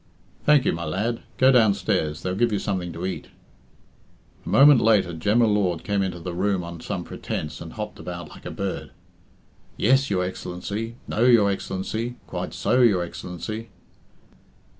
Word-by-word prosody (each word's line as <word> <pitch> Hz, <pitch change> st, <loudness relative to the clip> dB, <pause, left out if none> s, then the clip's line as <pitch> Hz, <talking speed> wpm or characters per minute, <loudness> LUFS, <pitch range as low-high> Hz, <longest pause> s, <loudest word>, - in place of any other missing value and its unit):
"Thank 150 Hz, -3 st, +6 dB
you, -, -, +2 dB
my 85 Hz, -, -4 dB
lad. 105 Hz, +9 st, -1 dB, 0.2 s
Go 130 Hz, +1 st, +6 dB
downstairs. 100 Hz, -, +2 dB
They'll 90 Hz, -, -1 dB
give 115 Hz, +4 st, +1 dB
you 105 Hz, -, +1 dB
something 95 Hz, -3 st, -2 dB
to 85 Hz, +2 st, -5 dB
eat." 95 Hz, -, -4 dB, 1.2 s
A -, -, -7 dB
moment 140 Hz, +3 st, +7 dB
later 105 Hz, -6 st, +3 dB
Jem 105 Hz, +9 st, +2 dB
y -, -, +6 dB
Lord 100 Hz, -6 st, +1 dB
came 100 Hz, -1 st, 0 dB
into 95 Hz, -2 st, -2 dB
the 85 Hz, +1 st, -5 dB
room 95 Hz, +1 st, 0 dB
on 85 Hz, -1 st, -8 dB
some 90 Hz, -2 st, -4 dB
pretence 75 Hz, -3 st, -5 dB
and 80 Hz, -, -8 dB
hopped 105 Hz, -1 st, -6 dB
about 85 Hz, -3 st, -7 dB
like -, -, -11 dB
a -, -, -4 dB
bird. -, -, -4 dB, 0.9 s
"Yes, 135 Hz, +2 st, +3 dB
your 95 Hz, -3 st, +1 dB
Excellency 95 Hz, +5 st, -5 dB
No, 115 Hz, -, +1 dB
your 115 Hz, -5 st, +5 dB
Excellency 110 Hz, +5 st, -3 dB
Quite -, -, -5 dB
so, 125 Hz, -, +2 dB
your 100 Hz, -7 st, +4 dB
Excellency." 90 Hz, +6 st, -6 dB
100 Hz, 165 wpm, -24 LUFS, 90-115 Hz, 1.2 s, moment